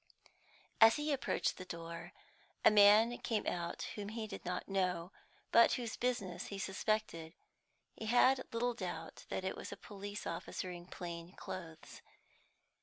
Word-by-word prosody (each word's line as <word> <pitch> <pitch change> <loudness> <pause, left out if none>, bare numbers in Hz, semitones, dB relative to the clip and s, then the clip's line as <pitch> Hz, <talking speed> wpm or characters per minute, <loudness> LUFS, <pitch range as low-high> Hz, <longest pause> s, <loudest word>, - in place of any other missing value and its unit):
As 225 0 +9
he 300 0 -1
approached 270 - 0
the - - -6
door, 170 -1 -7 0.5
a - - +9
man 210 +3 +7
came 220 -3 -1
out 170 -1 -2
whom 205 -1 -5
he 220 0 -4
did 215 - -8
not 180 0 -3
know, 185 -2 0 0.4
but 230 - +7
whose 235 -3 -2
business 205 -8 -2
he 200 - -5
suspected. 195 -4 -1 0.6
He 220 - -7
had 255 +3 +5
little 240 +1 0
doubt 175 -7 -6
that - - -2
it 190 - -2
was - - -7
a - - -6
police 205 0 -7
officer 185 - -4
in 175 0 -9
plain 170 0 -7
clothes. 165 -3 -8
200 Hz, 150 wpm, -36 LUFS, 175-225 Hz, 0.6 s, As